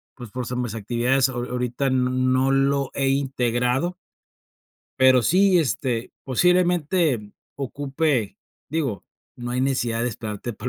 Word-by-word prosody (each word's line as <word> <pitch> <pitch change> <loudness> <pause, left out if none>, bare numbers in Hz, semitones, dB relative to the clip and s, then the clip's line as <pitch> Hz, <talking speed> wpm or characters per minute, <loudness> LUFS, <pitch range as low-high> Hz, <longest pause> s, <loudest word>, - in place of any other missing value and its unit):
pues, 120 -3 -9
por 125 +2 -4
s 125 - -4
mis 120 -3 -3
actividades, 120 +5 +1
aho 120 -2 -4
ahorita 125 +2 -2
no 130 +1 +2
lo 135 0 +1
he 135 -1 0
integrado 130 +3 0 1.1
pero 130 -2 +6
sí, 185 - +4
este, 125 -4 -1
posiblemente 170 - +2 0.2
ocupe 140 -3 -1 0.3
digo, 140 -8 -2 0.3
no 120 0 -5
hay 125 - 0
necesidad 120 -4 0
de 125 - +1
esperarte 110 0 -5
para 120 - -5
130 Hz, 130 wpm, -23 LUFS, 120-140 Hz, 1.1 s, pero